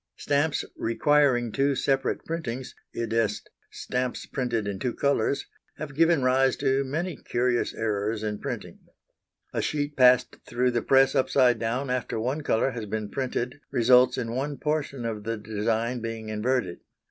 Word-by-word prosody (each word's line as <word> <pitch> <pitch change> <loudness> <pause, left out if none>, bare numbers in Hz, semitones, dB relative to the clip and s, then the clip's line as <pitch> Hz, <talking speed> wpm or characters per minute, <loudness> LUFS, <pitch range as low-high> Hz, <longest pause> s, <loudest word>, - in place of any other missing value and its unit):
Stamps 145 +2 0
requiring 120 0 +2
two 140 +3 +1
separate 135 0 0
printings 130 -6 -4 0.2
i.e. 115 0 -2 0.6
stamps 125 0 -3
printed 120 -5 -2
in 100 -2 -3
two 120 +2 -2
colours 140 0 +1 0.3
have 150 -1 -6
given 165 -1 +3
rise 130 0 +3
to 135 0 +1
many 155 +4 -3
curious 120 0 0
errors 110 0 -1
in 105 -1 -3
printing. - - -6 0.7
A - - 0
sheet 145 -1 -2
passed 125 -1 +5
through 125 +1 0
the 120 -1 0
press 135 0 +4
upside 130 -3 +3
down 125 +4 -1
after 125 -3 -2
one 130 +7 -1
colour 135 -1 +1
has 115 -4 -6
been 105 0 -4
printed 130 +1 -3
results 125 +1 +4
in 115 -2 -3
one 140 +3 -2
portion 145 -5 -2
of 110 -2 -3
the 115 +1 -2
design 110 +3 -1
being 115 -1 -5
inverted. 110 -3 -1
125 Hz, 150 wpm, -26 LUFS, 115-140 Hz, 0.7 s, passed